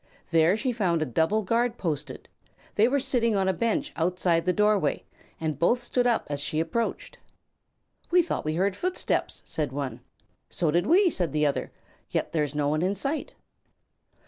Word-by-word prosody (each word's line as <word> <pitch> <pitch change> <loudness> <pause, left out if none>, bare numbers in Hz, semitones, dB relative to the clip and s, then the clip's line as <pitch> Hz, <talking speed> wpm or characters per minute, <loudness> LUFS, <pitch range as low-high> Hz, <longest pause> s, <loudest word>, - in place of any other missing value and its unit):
There 165 +4 +4
she 255 +3 0
found 180 -8 +1
a - - -2
double 160 - +1
guard 235 +4 0
posted. 150 -5 -4 0.5
They 215 +2 +4
were 280 +3 +1
sitting 245 -5 +1
on 190 -1 +1
a 190 - +2
bench 230 - -1
outside 170 0 +1
the - - +5
doorway 210 -6 +2 0.4
and 155 -3 -3
both 235 +9 +3
stood 245 0 0
up 235 - +1
as 145 -1 -3
she 155 +2 -1
approached. 165 +9 -2 0.9
"We 355 0 +5
thought 350 - -3
we 155 +1 -2
heard 190 +2 +1
footsteps," 365 - -2
said 150 -4 -2
one. 140 -1 -4 0.5
"So 165 -4 0
did 175 +5 +1
we," 375 +5 +5
replied 185 - 0
the 150 0 +2
other; 145 - -1 0.4
"yet - - -2
there 155 -2 +1
is 145 0 -4
no 145 -1 +1
one 155 +2 0
in 190 +3 0
sight." 285 +8 -2
185 Hz, 180 wpm, -26 LUFS, 155-235 Hz, 0.9 s, the